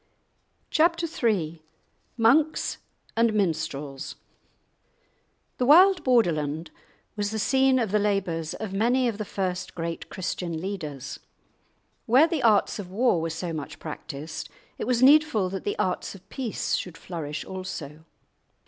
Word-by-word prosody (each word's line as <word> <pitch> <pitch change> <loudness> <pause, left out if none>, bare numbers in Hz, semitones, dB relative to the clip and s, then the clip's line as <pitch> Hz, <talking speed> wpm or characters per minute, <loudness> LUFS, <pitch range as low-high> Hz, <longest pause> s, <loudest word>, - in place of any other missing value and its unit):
*Chapter 335 +1 +3
III* 195 - -1 0.6
*Monks 280 +7 +3 0.4
and 230 -1 +3
Minstrels* 145 -7 -2 1.4
The 250 - +2
wild 370 +6 +7
Borderland 160 - +1 0.4
was 205 -1 -1
the 220 - -3
scene 265 +3 +3
of 225 -6 0
the 210 - +3
labours 190 -6 -1
of 215 -3 -5
many 245 +5 +2
ol 230 - -1
the 215 - -4
first 185 -2 -3
great 165 -1 -4
Christian 175 -2 -3
leaders. 155 -8 -5 0.9
Where 255 +7 +6
the 330 -3 -1
arts 215 -3 +3
of 190 -3 -6
war 205 -3 +2
were 165 - -2
so 165 +1 -4
much 150 -3 -6
practised, 155 0 -7 0.3
it - - -3
was 250 -1 +2
needful 280 -8 +5
that 195 -1 -5
the 205 - -1
arts 185 +2 -1
of 190 - -16
peace 250 -6 -3
should 175 -3 -2
flourish 150 -4 -5
also. 160 -5 -7
195 Hz, 135 wpm, -26 LUFS, 165-245 Hz, 1.4 s, wild